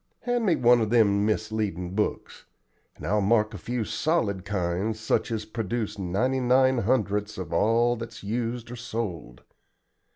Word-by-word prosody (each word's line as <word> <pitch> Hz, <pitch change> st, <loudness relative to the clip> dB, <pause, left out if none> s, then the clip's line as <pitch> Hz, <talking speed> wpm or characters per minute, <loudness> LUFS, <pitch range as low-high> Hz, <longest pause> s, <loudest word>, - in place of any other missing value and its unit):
Hand 245 Hz, -3 st, 0 dB
me 170 Hz, -, +4 dB
one 120 Hz, -1 st, +5 dB
of 110 Hz, -, 0 dB
them 105 Hz, -3 st, +3 dB
misleadin' 105 Hz, -5 st, -2 dB
books, 105 Hz, +1 st, -3 dB, 0.5 s
and -, -, -10 dB
I'll 105 Hz, +2 st, +1 dB
mark 105 Hz, +1 st, +2 dB
a 100 Hz, -, -7 dB
few 120 Hz, +3 st, -3 dB
solid 105 Hz, -, 0 dB
kinds 100 Hz, +2 st, -1 dB
such 110 Hz, +2 st, 0 dB
as 110 Hz, -2 st, -2 dB
produce 110 Hz, -1 st, -3 dB
ninety 100 Hz, +9 st, 0 dB
nine 130 Hz, 0 st, +3 dB
hundredths 105 Hz, -2 st, 0 dB
of 95 Hz, -2 st, -5 dB
all 115 Hz, +6 st, +3 dB
that's 115 Hz, -1 st, -8 dB
used 115 Hz, +2 st, -3 dB
or -, -, -5 dB
sold. 105 Hz, -, -5 dB
110 Hz, 155 wpm, -26 LUFS, 100-120 Hz, 0.5 s, one